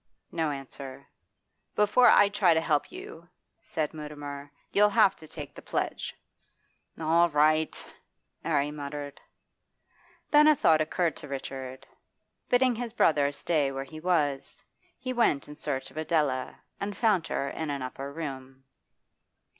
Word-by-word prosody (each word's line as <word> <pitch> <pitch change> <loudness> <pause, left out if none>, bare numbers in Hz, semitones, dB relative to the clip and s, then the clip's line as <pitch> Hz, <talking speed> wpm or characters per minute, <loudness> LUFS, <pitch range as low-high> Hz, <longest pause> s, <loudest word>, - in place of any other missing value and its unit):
No 160 -2 0
answer 135 -1 -8 0.7
'Before 210 +4 +5
I 205 - +7
try 200 -4 +3
to - - +4
help 155 -2 0
you,' 170 +1 -10 0.3
said 155 -2 -3
Mutimer, 145 -2 -7 0.2
'you'll 210 +1 +5
have 195 -1 +4
to 155 - -13
take 150 -2 -8
the - - -11
pledge.' - - -3 0.8
'All 165 +2 +4
right!' 155 +1 +1 0.5
'Arry 145 -2 +1
muttered. 145 -1 -6 1.1
Then 300 0 +7
a 305 - +7
thought 160 - +4
occurred 165 +2 0
to - - -8
Richard. 130 -1 -6 0.6
Bidding 250 0 +4
his 235 -1 -5
brother 145 -3 +3
stay 145 -1 0
where 135 0 -4
he 155 +3 -10
was, 155 -5 -1 0.3
he 255 - -4
went 230 - +2
in 150 - -9
search 145 -3 -3
of - - -15
Adela 150 -5 0 0.2
and 200 0 -4
found 200 -8 +2
her 140 - -2
in 160 -2 -4
an 140 -2 -3
upper 135 +2 -6
room. 135 -4 -7
155 Hz, 140 wpm, -28 LUFS, 140-170 Hz, 1.1 s, I